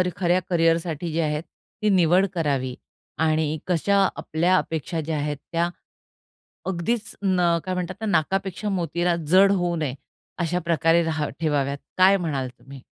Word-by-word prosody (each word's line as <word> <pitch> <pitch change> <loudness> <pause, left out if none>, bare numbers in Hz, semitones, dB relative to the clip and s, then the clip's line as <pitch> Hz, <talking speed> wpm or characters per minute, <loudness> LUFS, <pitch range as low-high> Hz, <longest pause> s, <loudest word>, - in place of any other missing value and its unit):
खऱ्या 180 0 +2
करिअरसाठी 165 -1 +1
जे 165 - +1
आहेत 150 0 -1 0.4
ती 215 - +2
निवड 180 0 +4
करावी 140 -6 -1 0.5
आणि 155 0 +1
कशा 185 +3 +2 0.2
आपल्या 175 +4 +1
अपेक्षा 160 +1 -2
ज्या 155 0 -3
आहेत, 145 0 -2
त्या 170 +1 +1 1.0
अगदीच 190 +5 -2
न 180 -3 +3
काय 185 0 -2
म्हणतात 180 +4 -4
नाकापेक्षा 195 +3 0
मोतीला 175 -2 0
जड 195 +4 +6
होऊ 175 -3 0
नये 150 -5 -2 0.4
अशा 175 0 0
प्रकारे 165 0 +3
रहा 155 -2 -1
ठेवाव्यात 145 -3 0 0.2
काय 190 +2 +6
म्हणाल 145 -8 -2
तुम्ही? 135 +2 -12
170 Hz, 140 wpm, -24 LUFS, 155-185 Hz, 1.0 s, जड